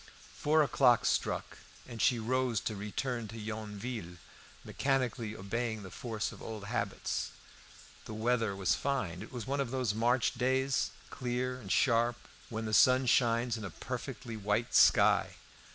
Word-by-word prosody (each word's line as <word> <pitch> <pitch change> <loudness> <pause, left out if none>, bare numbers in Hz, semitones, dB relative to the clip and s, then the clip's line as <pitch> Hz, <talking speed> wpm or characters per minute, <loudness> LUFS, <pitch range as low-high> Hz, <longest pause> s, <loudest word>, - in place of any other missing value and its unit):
Four 155 +1 +3
o'clock 125 -4 +4
struck, - - -1 0.3
and 120 -3 -6
she 125 - +4
rose 125 0 0
to 110 - -3
return 110 +4 -3
to 115 - -9
Yonville, 105 -3 -5 0.5
mechanically 125 -5 -1
obeying 110 +2 -3
the 95 - -9
force 110 -3 -3
of - - -12
old 110 -2 -6
habits. 110 -2 -2 0.8
The - - -7
weather 115 -2 +1
was 95 -2 +2
fine. 95 -11 -2
It 110 - -9
was 120 -4 -5
one 140 +2 -1
of 135 - -2
those 125 -4 0
March 120 +2 +2
days, 130 +2 +1 0.2
clear 125 0 -2
and 95 -4 -6
sharp, 120 -1 +3 0.3
when 110 -1 -4
the 110 - -3
sun 130 +4 +6
shines 120 -1 +2
in 110 - -7
a 95 - -4
perfectly 115 +7 -6
white 105 +3 -1
sky. - - +5
115 Hz, 150 wpm, -32 LUFS, 110-125 Hz, 0.8 s, sun